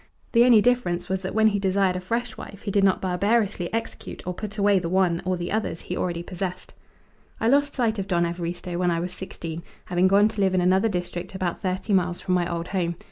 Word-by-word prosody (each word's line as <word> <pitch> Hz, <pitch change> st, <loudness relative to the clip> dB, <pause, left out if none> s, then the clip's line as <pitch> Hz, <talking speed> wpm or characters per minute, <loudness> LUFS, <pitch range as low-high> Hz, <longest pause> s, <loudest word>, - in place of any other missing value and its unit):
The 235 Hz, 0 st, +6 dB
only 235 Hz, -4 st, +7 dB
difference 235 Hz, -9 st, +1 dB
was 190 Hz, 0 st, -1 dB
that 190 Hz, +1 st, -5 dB
when 220 Hz, 0 st, +5 dB
he 205 Hz, -1 st, -1 dB
desired 190 Hz, -1 st, +2 dB
a -, -, -1 dB
fresh 230 Hz, +4 st, -3 dB
wife 200 Hz, -1 st, -10 dB
he 205 Hz, -, -2 dB
did 200 Hz, 0 st, +2 dB
not 190 Hz, -1 st, +3 dB
barbarously 195 Hz, 0 st, +1 dB
execute 225 Hz, 0 st, -5 dB
or 180 Hz, -, -2 dB
put 210 Hz, +3 st, -7 dB
away 200 Hz, -1 st, +4 dB
the 170 Hz, -2 st, -3 dB
one, 180 Hz, -2 st, +2 dB
or 185 Hz, 0 st, 0 dB
the 175 Hz, 0 st, -4 dB
others, 215 Hz, -5 st, -2 dB
he 180 Hz, -, -5 dB
already 170 Hz, -2 st, -2 dB
possessed. 180 Hz, 0 st, -5 dB, 0.7 s
I 225 Hz, -, +1 dB
lost 285 Hz, +3 st, +3 dB
sight 225 Hz, -4 st, +1 dB
of 195 Hz, -, -3 dB
Don 175 Hz, -2 st, +2 dB
Evaristo 175 Hz, +1 st, -4 dB
when 180 Hz, -1 st, +2 dB
I 170 Hz, -1 st, +1 dB
was 180 Hz, +1 st, -4 dB
sixteen, 170 Hz, -3 st, -7 dB, 0.2 s
having 180 Hz, +1 st, +2 dB
gone 200 Hz, +2 st, +5 dB
to 215 Hz, -2 st, -4 dB
live 190 Hz, -1 st, +2 dB
in 185 Hz, -, +3 dB
another 190 Hz, +5 st, +3 dB
district 180 Hz, -1 st, -4 dB
about 185 Hz, -2 st, -2 dB
thirty 190 Hz, +2 st, -2 dB
miles 180 Hz, -2 st, +1 dB
from 185 Hz, -, -1 dB
my 175 Hz, -1 st, +1 dB
old 170 Hz, 0 st, -3 dB
home. 175 Hz, -3 st, -1 dB
185 Hz, 235 wpm, -25 LUFS, 175-205 Hz, 0.7 s, only